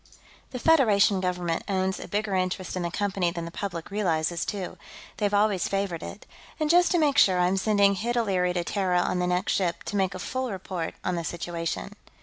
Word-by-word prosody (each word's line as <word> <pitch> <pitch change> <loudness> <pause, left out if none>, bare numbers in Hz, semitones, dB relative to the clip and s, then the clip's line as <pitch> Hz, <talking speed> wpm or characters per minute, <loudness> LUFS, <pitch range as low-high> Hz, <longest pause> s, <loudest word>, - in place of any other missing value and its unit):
The 255 - -6
Federation 220 -10 +4
Government 180 -2 -1
owns 190 -1 0
a - - -7
bigger 210 0 -2
interest 185 0 -1
in 185 - -2
the 170 - -1
Company 190 -1 0
than 170 -1 -5
the 170 - -7
public 175 -2 -5
realizes, 170 -4 0
too; 195 -3 -5 0.4
they've 205 -1 0
always 205 -3 +2
favored 195 -4 -2
it. 210 - -8 0.3
And 310 0 +2
just 350 +1 +5
to - - +3
make 290 -3 +3
sure, 185 -2 +5
I'm 180 +2 +3
sending 200 0 +3
Hid 235 +5 -2
O'Leary 185 -6 +1
to 175 -1 -1
Terra 185 -1 0
on 180 - -1
the 180 - 0
next 180 +1 0
ship, 175 -3 -1
to - - -5
make 190 -1 +1
a - - -4
full 255 +7 -3
report 185 -3 -4
on 180 - -1
the 170 - -2
situation." 170 - -4
190 Hz, 205 wpm, -26 LUFS, 180-205 Hz, 0.4 s, just